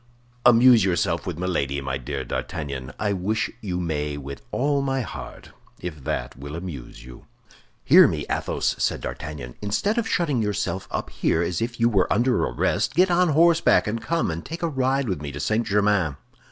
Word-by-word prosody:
"Amuse 120 -2 +7
yourself 90 -4 0
with - - -3
Milady, 70 -7 -1
my 65 -1 -3
dear 70 +1 -4
D'Artagnan; 70 -2 -4
I 105 -2 0
wish 100 +4 -1
you 90 -5 -3
may 75 -4 -2
with 70 0 -8
all 140 +2 +1
my 135 -1 0
heart, 115 - -8 0.3
if 75 -6 -7
that - - -3
will 70 +3 -8
amuse 80 -9 -8
you." 60 -1 -13 0.6
"Hear - - +8
me, - - -3
Athos," - - -1
said - - 0
D'Artagnan. 75 -6 -6
"Instead 200 - 0
of 225 - -2
shutting 150 -9 +1
yourself 95 -3 -2
up - - -4
here 85 - +1
as 85 -1 -2
if 120 +1 -3
you 115 - +4
were 100 -6 +2
under 120 +3 +2
arrest, - - 0
get 180 +1 +4
on 175 0 +3
horseback 165 +2 +4
and 110 +2 -2
come 165 - 0
and 85 +1 -5
take 165 +2 -7
a - - +2
ride 135 -2 0
with 90 -7 -2
me 75 -1 -5
to 75 - -6
St. 110 +10 0
Germain." 100 -7 +2
95 Hz, 185 wpm, -24 LUFS, -, 0.6 s, Hear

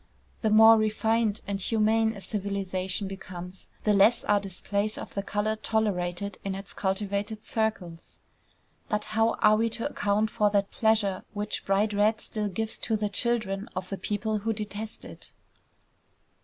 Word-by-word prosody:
The 220 - +2
more 220 +1 +8
refined 215 0 +1
and 200 -1 -3
humane 220 +2 +2
a 200 - -10
civilization 195 -1 -2
becomes, 185 -1 -8
the 210 - +3
less 210 +4 +5
are 205 0 +3
displays 200 +2 -2
of - - -8
the 200 - -1
color 205 +2 -1
tolerated 200 -3 -1
in 195 -1 -2
its 195 0 -7
cultivated 200 +2 -2
circles. 195 -7 -3 0.7
But 210 0 0
how 225 +1 +3
are 215 0 +6
we 230 +1 +2
to 230 +3 -2
account 210 -4 0
for 210 -3 +2
that 200 -1 +1
pleasure 215 -4 +1
which 210 0 -3
bright 205 +2 +2
red 210 +2 +3
still 215 -1 -3
gives 220 +3 -3
to 220 -2 0
the 210 -1 -1
children 210 -1 0
of 185 0 -4
the 195 - -3
people 215 +1 -1
who 225 +2 -1
detest 210 0 -5
it? - - -11
210 Hz, 155 wpm, -27 LUFS, 195-220 Hz, 0.7 s, more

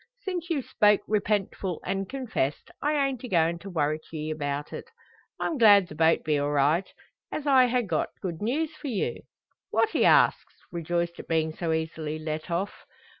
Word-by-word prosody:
Since 360 -3 -4
you've 290 -6 -1
spoke 210 -2 +3
repentful, 200 -4 -1
an' 195 0 -2
confessed, 235 - -3
I 295 +1 +1
ain't 265 -3 -3
a - - -4
goin' 170 -4 +2
to 200 - -9
worrit 155 -3 0
ye 155 -1 -4
about 145 -1 -3
it. - - -6 0.5
I'm 310 - -1
glad 205 -5 +7
the - - -8
boat 160 +1 +3
be 150 -2 +1
all 145 0 0
right, 150 +6 +2 0.4
as 300 - -4
I 260 -3 +6
ha' 245 -1 +1
got 165 -5 -1
good 170 -4 -5
news 295 +9 -1
for 310 - -8
you." 225 -7 -2 0.5
"What?" 445 - +2
he - - +1
asks, - - +4 0.2
rejoiced 170 0 -2
at - - -9
being 160 -1 0
so 165 0 -2
easily 160 -1 -2
let 155 +1 -5
off. 180 +4 -1
175 Hz, 180 wpm, -27 LUFS, 155-240 Hz, 0.5 s, glad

